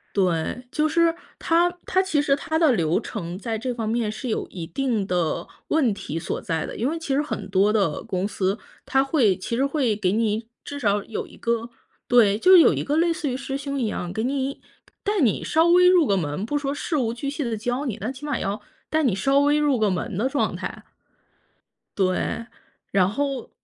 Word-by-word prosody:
对， 185 +6 0
就 310 0 +1
是， 335 +1 +3 0.2
它 340 +2 +3 0.2
它 375 - +2
其 350 -6 +1
实 280 -1 +2
它 320 +3 -2
的 320 -3 +5
流 170 -7 +2
程， 180 -6 -6
在 225 +2 -3
这 250 +3 -3
方 230 -2 -3
面， 225 -1 0
是 250 - -6
有 225 - -2
一 170 -3 -7
定 230 +2 -1
的 175 -4 -1 0.2
问 275 -9 +2
题 165 -5 -5
所 165 - -3
在 165 -2 -2
的， - - -7
因 240 +5 0
为 325 - -2
其 320 -4 -3
实 280 - +3
很 250 -9 -4
多 195 +2 +3
的 195 -8 0
公 190 -3 -2
司， 195 0 -1 0.3
它 265 +1 +3
会 255 - +2
其 230 - -3
实 265 +3 +2
会 275 -6 +1
给 195 -3 0
你 220 +1 0 0.2
至 285 - -6
少 205 -4 +1
有 220 - -5
一 - - -16
个 235 0 -1 0.4
对， 215 -4 +5
就 365 - +5
是， 370 - +10
有 - - +6
一 - - -2
个 295 +2 0
类 335 +1 +3
似 320 -3 -3
于 255 - -2
师 270 0 -5
兄 280 0 -4
一 245 - 0
样， 180 -4 -4
给 220 +4 -2
你 270 +1 -2 0.4
带 415 0 0
你 235 -7 +2
稍 325 +1 +3
微 360 +1 +6
入 360 -5 +5
个 200 - +2
门， 150 +1 -2
不 290 +6 -1
说 280 -1 -2
事 305 +2 -2
无 230 -4 0
巨 275 +4 -4
细 290 +1 -3
地 235 -3 -2
教 245 +6 -2
你， 230 -6 -3
那 220 +5 -2
起 270 +2 -9
码 290 -4 -1
要 200 +3 -2 0.3
带 315 0 +1
你 250 -8 +2
稍 275 +9 +2
微 290 +1 +3
入 290 -3 +2
个 215 -3 +2
门 185 +1 -3
的 225 +6 +1
状 280 +1 0
态。 - - -6 1.1
对， 190 +4 0 0.5
然 190 -2 +3
后。 270 +3 -2
245 Hz, 240 characters per minute, -24 LUFS, 205-290 Hz, 1.1 s, 是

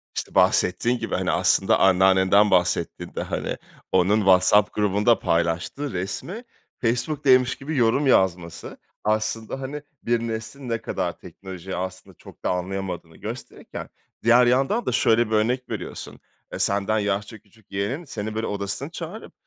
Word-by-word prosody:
işte - - -5
bahsettiğin 120 +7 +3
gibi - - -3
hani 95 -1 0
aslında 90 +3 +3
anneannenden 95 +2 +4
bahsettin 90 -2 0
de. - - -2
Hani, - - -3 0.3
onun 95 +3 +3
WhatsApp 95 +1 +4
grubunda 105 +2 +2
paylaştığı 85 - -1
resmi 105 - -4 0.4
Facebook'taymış 130 +1 +2
gibi 145 +2 -5
yorum 125 +4 +3
yazması. 85 -7 +1 0.3
Aslında, 110 +4 -1
hani, 145 +3 -5 0.2
bir 120 0 +1
neslin 115 +3 -5
ne 115 - 0
kadar - - -3
teknolojiyi 95 -1 -8
aslında 95 +1 -6
çok - - -15
da - - +2
anlayamadığını 90 -2 -4
gösterirken 115 +5 -8 0.3
diğer 120 +2 +6
yandan 135 - +2
da - - 0
şöyle 115 +1 +3
bir - - -10
örnek 125 +4 0
veriyorsun. 110 -5 -6 0.3
Eee, - - -4
senden 100 +2 +1
yaşça 105 +2 -2
küçük 105 0 -26
yeğenin 105 - -3
seni 110 -5 -5
böyle 110 +1 -2
odasına 100 -1 -3
çağırıp - - -8
105 Hz, 140 wpm, -24 LUFS, 95-120 Hz, 0.4 s, diğer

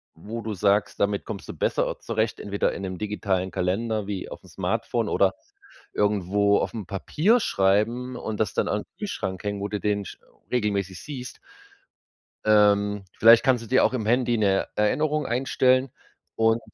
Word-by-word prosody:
wo 110 +8 -7
du 110 0 -4
sagst, 100 +1 +1
damit 100 0 0
kommst 105 -3 -7
du - - -4
besser - - -1
zurecht. 110 -1 -2
Entweder 100 0 -1
in - - -6
'nem 95 -2 -4
digitalen 100 -3 -2
Kalender 105 +3 -1
wie 100 -3 -4
auf'm - - -10
Smartphone - - -2
oder - - +3 0.6
irgendwo 100 0 +2
auf'm 110 -5 -3
Papier 160 - +2
schreiben 115 - +1
und 110 -3 -5
das 110 -4 0
dann - - +1
an - - -1
Kühlschrank 95 0 -4
hängen, 100 -1 -3
wo 100 - -2
du 105 0 -3
den 100 0 -1
sch - - -9 0.3
regelmäßig 100 -6 -1
siehst. 130 -4 -8 1.1
Ähm, 105 -1 +3
vielleicht 115 +1 +7
kannst 125 -3 +3
du 115 - -10
dir 130 - +4
auch - - +2
im 115 -5 -2
Handy 120 0 +2
'ne 100 -3 +1
Erinnerung 150 +7 +1
einstellen 130 +1 +2 0.4
und 115 +1 +2
105 Hz, 160 wpm, -25 LUFS, 100-115 Hz, 1.1 s, vielleicht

